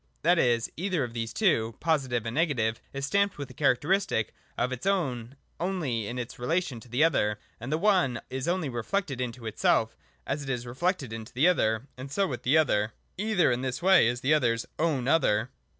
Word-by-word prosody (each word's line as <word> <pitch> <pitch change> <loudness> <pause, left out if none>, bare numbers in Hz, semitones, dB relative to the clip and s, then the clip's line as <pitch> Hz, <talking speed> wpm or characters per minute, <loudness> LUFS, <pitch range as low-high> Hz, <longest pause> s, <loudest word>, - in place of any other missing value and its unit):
That 170 +2 +4
is, 120 -2 +2
either 180 -3 0
of 120 -2 -5
these 115 -1 -3
two 115 - +1
(Positive 130 -8 0
and 115 - -3
Negative) 125 -8 0
is 140 0 -3
stamped 200 +6 +1
with 140 -3 -6
a - - -11
characteristic 145 - +1 0.2
of 125 - 0
its 130 +8 -4
own 135 -10 -1 0.2
only 155 - -1
in 120 - -5
its 120 -1 -6
relation 150 0 -1
to 120 - -16
the 125 +6 +2
other: 105 -10 +2 0.2
the 135 +7 -2
one 175 - +2
is 130 +2 -3
only 175 -2 0
reflected 135 - -2
into 120 -1 -5
itself 110 - +1 0.3
as 145 +2 -2
it 140 - -6
is 125 -2 -2
reflected 135 - -2
into 110 -1 -7
the 140 +7 +4
other. 110 -9 +2
And 135 +1 -7
so 195 +7 +2
with 130 -9 -4
the 140 +6 +3
other. 105 -9 +2 0.3
Either 210 - +2
in 120 +1 0
this 130 +5 -3
way 190 -10 +6
is 120 +1 -1
the 145 +4 +3
other's 115 -6 +2
own 150 -6 +1
other. 125 -6 +2
130 Hz, 200 wpm, -28 LUFS, 120-165 Hz, 0.3 s, way